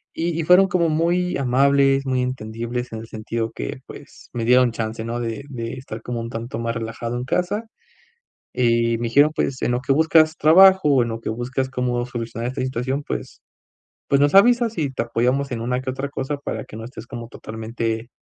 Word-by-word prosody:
Y 165 Hz, 0 st, -1 dB
y 165 Hz, -, 0 dB
fueron 180 Hz, +4 st, +6 dB
como 175 Hz, -2 st, +1 dB
muy 175 Hz, +3 st, +1 dB
amables, 135 Hz, +1 st, +3 dB
muy 130 Hz, -1 st, 0 dB
entendibles 120 Hz, 0 st, -4 dB
en 110 Hz, -, -4 dB
el 115 Hz, -, -9 dB
sentido 115 Hz, +1 st, -4 dB
que, -, -, -6 dB
pues, -, -, -13 dB
me 115 Hz, -2 st, -3 dB
dieron 125 Hz, 0 st, +5 dB
chance, 110 Hz, 0 st, -4 dB
no 115 Hz, +1 st, -3 dB
de 115 Hz, +3 st, -4 dB
de 115 Hz, -3 st, -5 dB
estar 120 Hz, -4 st, -8 dB
como 120 Hz, -1 st, -4 dB
un 115 Hz, 0 st, -5 dB
tanto 115 Hz, 0 st, -5 dB
más 115 Hz, 0 st, -2 dB
relajado 115 Hz, +1 st, -4 dB
en 125 Hz, -, -3 dB
casa. 180 Hz, -, -1 dB, 0.9 s
Y 115 Hz, -2 st, +2 dB
me 120 Hz, -, -3 dB
dijeron, 145 Hz, +6 st, +4 dB
pues, 130 Hz, -4 st, -2 dB
en -, -, +1 dB
lo 120 Hz, -, 0 dB
que 135 Hz, -, 0 dB
buscas 155 Hz, +2 st, +4 dB
trabajo, 190 Hz, +2 st, +6 dB
o 130 Hz, -, +4 dB
en 120 Hz, -, -2 dB
lo 115 Hz, 0 st, -5 dB
que -, -, -5 dB
buscas 130 Hz, +3 st, -3 dB
cómo 125 Hz, -2 st, -1 dB
solucionar 115 Hz, -1 st, -4 dB
esta 130 Hz, -, -5 dB
situación. 130 Hz, +2 st, -2 dB
Pues, -, -, -6 dB, 0.7 s
pues 140 Hz, -, +3 dB
nos 145 Hz, +3 st, +3 dB
avisas 235 Hz, +2 st, +5 dB
y 145 Hz, -4 st, -1 dB
te 130 Hz, -, -2 dB
apoyamos 125 Hz, +4 st, 0 dB
en 115 Hz, -, -3 dB
una 125 Hz, +1 st, -1 dB
que 130 Hz, -, -8 dB
otra 135 Hz, +2 st, -4 dB
cosa 140 Hz, +1 st, -3 dB
para 145 Hz, -, -5 dB
que -, -, -11 dB
no 110 Hz, -, -7 dB
estés 120 Hz, -, -9 dB
como 120 Hz, -1 st, -8 dB
totalmente, 115 Hz, 0 st, -5 dB
125 Hz, 205 wpm, -22 LUFS, 115-140 Hz, 0.9 s, fueron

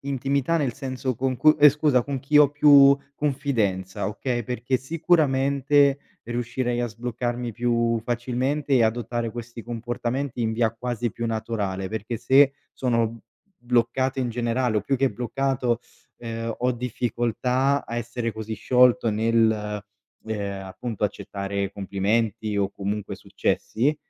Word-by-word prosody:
intimità, 140 Hz, +3 st, 0 dB
nel 140 Hz, -7 st, 0 dB
senso 130 Hz, 0 st, -3 dB
con 130 Hz, +2 st, -1 dB
cu 155 Hz, +3 st, +5 dB
eh, 150 Hz, -, +10 dB
scusa, 145 Hz, -3 st, +2 dB
con 140 Hz, +2 st, -4 dB
chi 145 Hz, +2 st, +3 dB
ho 145 Hz, -2 st, +6 dB
più 140 Hz, -1 st, +7 dB, 0.2 s
confidenza, 115 Hz, -12 st, -1 dB
okay? 120 Hz, +2 st, -3 dB
Perché 125 Hz, +2 st, -1 dB
sicuramente 140 Hz, -2 st, +2 dB, 0.2 s
riuscirei 120 Hz, +1 st, -2 dB
a 120 Hz, -, 0 dB
sbloccarmi 120 Hz, +1 st, -4 dB
più 115 Hz, 0 st, +1 dB
facilmente 125 Hz, +5 st, -2 dB
e 125 Hz, -3 st, +5 dB
adottare 115 Hz, +1 st, -1 dB
questi 120 Hz, 0 st, -8 dB
comportamenti 120 Hz, +2 st, -3 dB
in 110 Hz, -1 st, 0 dB
via 115 Hz, -1 st, +2 dB
quasi 120 Hz, -1 st, -3 dB
più 115 Hz, -, -4 dB
naturale, 105 Hz, -4 st, -3 dB
perché 110 Hz, +2 st, -4 dB
se 135 Hz, +4 st, +4 dB, 0.2 s
sono 115 Hz, -3 st, -1 dB, 0.4 s
bloccato 125 Hz, +2 st, 0 dB
in 125 Hz, -, -1 dB
generale 120 Hz, -1 st, 0 dB
o -, -, -2 dB
più 135 Hz, -, 0 dB
che 135 Hz, 0 st, +2 dB
bloccato, 125 Hz, -1 st, -1 dB, 0.4 s
ehm, 115 Hz, -1 st, -4 dB
ho 125 Hz, +1 st, +1 dB
difficoltà 125 Hz, +3 st, 0 dB
a 115 Hz, -, -5 dB
essere 120 Hz, 0 st, -3 dB
così 110 Hz, 0 st, -6 dB
sciolto 125 Hz, +2 st, +3 dB
nel, 110 Hz, -1 st, +1 dB, 0.4 s
ehm, 100 Hz, -3 st, -4 dB
appunto, 105 Hz, +3 st, -4 dB
accettare 100 Hz, 0 st, -3 dB
complimenti 105 Hz, +2 st, -1 dB
o 100 Hz, -, +1 dB
comunque 100 Hz, +1 st, -4 dB
successi, 140 Hz, +7 st, -1 dB
120 Hz, 135 wpm, -24 LUFS, 115-130 Hz, 0.4 s, eh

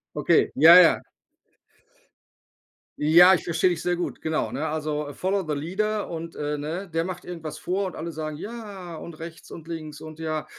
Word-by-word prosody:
Okay, -, -, +3 dB
ja, 160 Hz, +5 st, +9 dB
ja. 170 Hz, -, +5 dB, 2.0 s
Ja, 175 Hz, +5 st, +7 dB
ich 180 Hz, -, 0 dB
verstehe 170 Hz, +2 st, +2 dB
dich 170 Hz, -2 st, -2 dB
sehr 180 Hz, 0 st, 0 dB
gut, 175 Hz, -, -4 dB
genau. 160 Hz, 0 st, -1 dB
Ne, 155 Hz, +3 st, -2 dB
also 150 Hz, -1 st, -3 dB
„follow 190 Hz, +4 st, -1 dB
the 150 Hz, -, -1 dB
leader" 210 Hz, +7 st, -2 dB
und, 165 Hz, 0 st, -6 dB
äh, 150 Hz, 0 st, -3 dB
ne, 170 Hz, +6 st, -5 dB
der 165 Hz, +1 st, 0 dB
macht 180 Hz, -1 st, -6 dB
irgendwas 165 Hz, -3 st, -7 dB
vor 190 Hz, +2 st, -2 dB
und -, -, -8 dB
alle 170 Hz, +1 st, -5 dB
sagen 155 Hz, -1 st, -5 dB
„ja“ 195 Hz, -4 st, -8 dB
und 170 Hz, -, -9 dB
rechts 165 Hz, 0 st, -10 dB
und 165 Hz, 0 st, -10 dB
links 155 Hz, -2 st, -7 dB
und 155 Hz, 0 st, -10 dB
ja, 155 Hz, -1 st, -3 dB
165 Hz, 180 wpm, -25 LUFS, 155-180 Hz, 2.0 s, ja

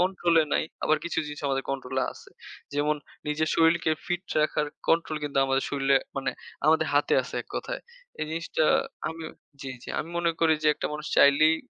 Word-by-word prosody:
কন্ট্রোলে 175 Hz, -3 st, +3 dB
নাই, -, -, +2 dB, 0.2 s
আবার 155 Hz, -, +4 dB
কিছু 170 Hz, -1 st, -2 dB
জিনিস 150 Hz, 0 st, -7 dB
আমাদের 135 Hz, -1 st, 0 dB
কন্ট্রোলে 130 Hz, -1 st, -2 dB
আছে। -, -, -15 dB, 0.4 s
যেমন 150 Hz, +1 st, +1 dB, 0.3 s
নিজের 155 Hz, +1 st, 0 dB
শরীরকে 165 Hz, 0 st, +4 dB, 0.2 s
ফিট 175 Hz, 0 st, -1 dB, 0.2 s
রাখার 150 Hz, 0 st, +1 dB, 0.2 s
কন্ট্রোল 165 Hz, -1 st, +2 dB
কিন্তু 140 Hz, -2 st, -1 dB
আমাদের 135 Hz, 0 st, +1 dB
শরীরে 140 Hz, -1 st, +3 dB, 0.2 s
মানে, 135 Hz, -, 0 dB, 0.4 s
আমাদের 160 Hz, 0 st, +4 dB
হাতে 145 Hz, -, +3 dB
আছে -, -, -9 dB
এক -, -, -35 dB
কথায়। -, -, -4 dB, 0.4 s
এই 155 Hz, -, -1 dB
জিনিসটা 160 Hz, -1 st, -1 dB, 0.4 s
আমি, 160 Hz, 0 st, -7 dB, 0.4 s
জি, 135 Hz, -, -5 dB
জি, -, -, -11 dB
আমি 165 Hz, -, -3 dB
মনে 170 Hz, -1 st, +2 dB
করি 160 Hz, -1 st, +5 dB
যে, 155 Hz, -, +4 dB
একটা -, -, -3 dB
মানুষ 150 Hz, 0 st, -5 dB
চাইলেই 155 Hz, +3 st, +6 dB
155 Hz, 180 wpm, -27 LUFS, 140-165 Hz, 0.4 s, চাইলেই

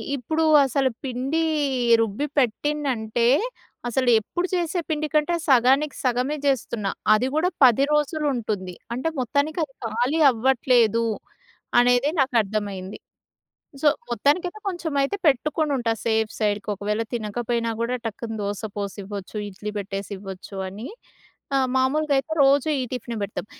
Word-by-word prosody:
ఇప్పుడు 315 Hz, +5 st, -1 dB, 0.2 s
అసలు 270 Hz, 0 st, +1 dB
పిండీ 265 Hz, +5 st, -1 dB, 0.6 s
రుబ్బి 225 Hz, +5 st, -1 dB
పెట్టింనంటే 245 Hz, -3 st, 0 dB, 0.6 s
అసలు 250 Hz, +1 st, +1 dB
ఎప్పుడు 350 Hz, -, -3 dB
చేసే 350 Hz, 0 st, -1 dB
పిండి 310 Hz, 0 st, -1 dB
కంటే 305 Hz, +3 st, +2 dB
సగానికి 270 Hz, +3 st, +4 dB
సగమే 255 Hz, +4 st, +1 dB
చేస్తున్నా. 235 Hz, -6 st, 0 dB, 0.2 s
అది 225 Hz, +4 st, +2 dB
కూడా 350 Hz, +4 st, +2 dB
10 255 Hz, +1 st, +6 dB
రోజులుంటుంది. 265 Hz, -, -1 dB, 0.2 s
అంటే 260 Hz, +7 st, -1 dB
మొత్తానికి 285 Hz, +6 st, 0 dB
అది 280 Hz, -3 st, -7 dB
ఖాళీ 245 Hz, +8 st, 0 dB
అవ్వట్లేదు 235 Hz, -2 st, +2 dB, 0.7 s
అనేదే 245 Hz, +3 st, +4 dB
నాకర్థమైంది. 205 Hz, -6 st, -1 dB, 0.8 s
సో 305 Hz, -, +6 dB, 0.2 s
మొత్తానికైతే, 320 Hz, -, +1 dB
కొంచెం 345 Hz, -4 st, -4 dB
అయితే 275 Hz, +9 st, -1 dB
పెట్టుకొనుంటా 280 Hz, -3 st, +1 dB
సేఫ్ 220 Hz, -1 st, +1 dB
సైడ్‌కి 210 Hz, -1 st, 0 dB
ఒకవేళ 210 Hz, +3 st, -2 dB
తినకపోయినా 230 Hz, +1 st, -2 dB
గూడా 240 Hz, +2 st, 0 dB
టక్కున 225 Hz, +1 st, -5 dB
దోస 205 Hz, +1 st, -3 dB
పోసివ్వచ్చు, 200 Hz, 0 st, -6 dB
ఇడ్లీ 205 Hz, +2 st, -6 dB
పెట్టేసివ్వచ్చు 195 Hz, -1 st, -6 dB
అని. 210 Hz, +6 st, -7 dB, 0.7 s
ఆ! -, -, +4 dB, 0.2 s
మామూలుగ 290 Hz, +4 st, +1 dB
అయితే 315 Hz, +4 st, -4 dB
రోజూ 280 Hz, +2 st, +4 dB
ఈ -, -, -1 dB
టిఫినే 240 Hz, -2 st, -4 dB
పెడతాం. 200 Hz, +1 st, -4 dB
245 Hz, 120 wpm, -24 LUFS, 215-285 Hz, 0.8 s, 10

